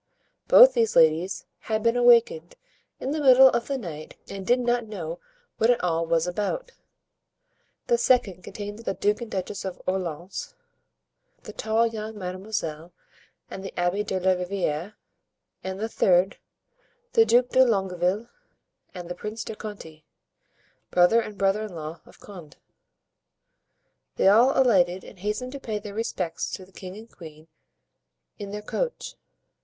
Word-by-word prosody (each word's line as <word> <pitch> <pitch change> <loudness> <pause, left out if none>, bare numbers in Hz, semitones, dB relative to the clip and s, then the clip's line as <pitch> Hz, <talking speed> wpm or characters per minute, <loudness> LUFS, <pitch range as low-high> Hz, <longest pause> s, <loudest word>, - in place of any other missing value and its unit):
Both - - +9
these 460 -2 +1
ladies 165 +4 +3
had 220 -1 -2
been 230 0 +2
awakened 235 -9 +4 0.4
in 265 - -3
the 305 0 -2
middle 265 -1 +8
of 235 -1 -1
the 275 - -1
night 155 - -8
and 195 -1 -8
did 245 +1 +4
not 240 -1 0
know 175 -5 -6 0.4
what 225 - +3
it 245 -5 +2
all 165 -1 0
was 165 0 +2
about. 210 - -3 1.1
The 480 -1 +2
second 200 -8 +2
contained 205 +1 -7
the 210 -4 -3
Duke 210 +3 0
and 235 - -6
Duchess 190 0 -4
of 190 -2 -6
Orleans, 185 - -4 0.9
the - - -9
tall 220 +1 +1
young 220 -1 -5
Mademoiselle 180 -4 -5 0.6
and 190 - -8
the 195 - -6
Abbé 175 +4 0
de 190 -2 -2
la 190 +1 +2
Riviere; 180 0 -2 0.7
and 190 0 -5
the 220 - -2
third, 185 -3 +2 0.8
the 455 -2 +6
Duke 245 - +3
de 260 - +5
Longueville 195 -1 0 0.7
and 175 -1 -7
the 175 - -4
Prince 210 +5 -6
de 220 - -7
Conti, 160 -8 -9 0.9
brother 180 +6 +4
and 210 -2 -8
brother 195 +2 +1
in 200 -5 -9
law 155 +1 -7
of - - -18
Condé. 175 -8 -12 1.6
They - - +2
all 235 +8 +5
alighted 190 -8 +3
and - - -14
hastened 210 +6 -3
to 280 - -7
pay 220 -5 -4
their 205 -1 -8
respects 195 -6 -3
to 185 - -6
the 190 - -23
king 185 0 -9
and 225 +2 -13
queen 155 -2 -13 0.9
in 200 -1 -6
their 210 +1 -6
coach. - - -4
200 Hz, 155 wpm, -25 LUFS, 180-230 Hz, 1.6 s, Both